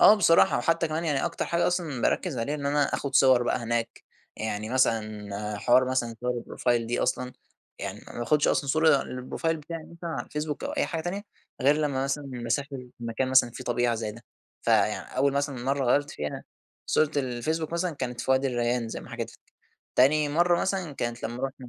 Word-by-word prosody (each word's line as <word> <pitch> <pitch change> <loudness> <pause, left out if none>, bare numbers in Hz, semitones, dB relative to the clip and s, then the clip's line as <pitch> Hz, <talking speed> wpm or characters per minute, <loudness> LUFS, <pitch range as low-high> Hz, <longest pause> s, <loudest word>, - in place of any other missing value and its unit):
آه 210 - +9
بصراحة، 170 -5 +5
وحتّى 165 +6 +1
كمان 155 +2 -2
يعني 145 -4 +1
أكتر 170 -1 -2
حاجة 170 0 +1
أصلًا 170 -8 -1
باركّز 170 -9 0
عليها 130 +6 -1
إن 145 -2 -3
أنا 145 +1 +2
آخد 140 -1 -3
صور 130 -3 +6
بقى 120 - +1
هناك، 115 -1 -2 0.3
يعني 110 -1 -3
مثلًا 105 -4 -1
حوار 125 +4 +4
مثلًا 120 -3 0
صور 125 -1 -2
الProfile 120 -2 0
دي 120 +1 -1
أصلًا، 125 0 -1 0.5
يعني - - -5
ما - - -7
باخدش 145 +5 +2
أصلًا 140 - +1
صورة 155 0 +5
للProfile 130 +6 -2
بتاعي 160 +1 -7
مثلًا 170 0 -6
على - - -4
الفيسبوك 150 0 -4
أو 280 - -2
أي 290 -1 0
حاجة 165 - -3
تانية، 185 +4 -3 0.4
غير 140 +3 +5
لمّا 140 -3 0
مثلًا 140 +2 -2
مسافر 125 +2 -3
مكان 120 +2 -2
مثلًا 130 -2 +5
في 125 - -8
طبيعة 120 -1 +1
زي 110 -2 -3
ده، 115 +3 -14 0.4
فيعني - - +1
أول 140 +1 +3
مثلًا 140 0 -1
مَرّة 135 +1 +1
غيّرت 145 +4 +2
فيها 75 0 -5 0.4
صورة 155 -1 +3
الفيسبوك 145 +5 -1
مثلًا 170 0 -1
كانت 125 -3 -4
فوادي 130 +1 +2
الريان 120 -2 0
زي - - -5
ما - - -12
حكيت - - -4
لَك، - - -23 0.4
تاني 145 +4 +4
مَرّة 175 +3 +3
مثلًا 190 -5 -1
كانت 120 -3 -4
لمّا 120 +3 -4
روحنا. 135 -2 -4
135 Hz, 195 wpm, -27 LUFS, 120-155 Hz, 0.5 s, آه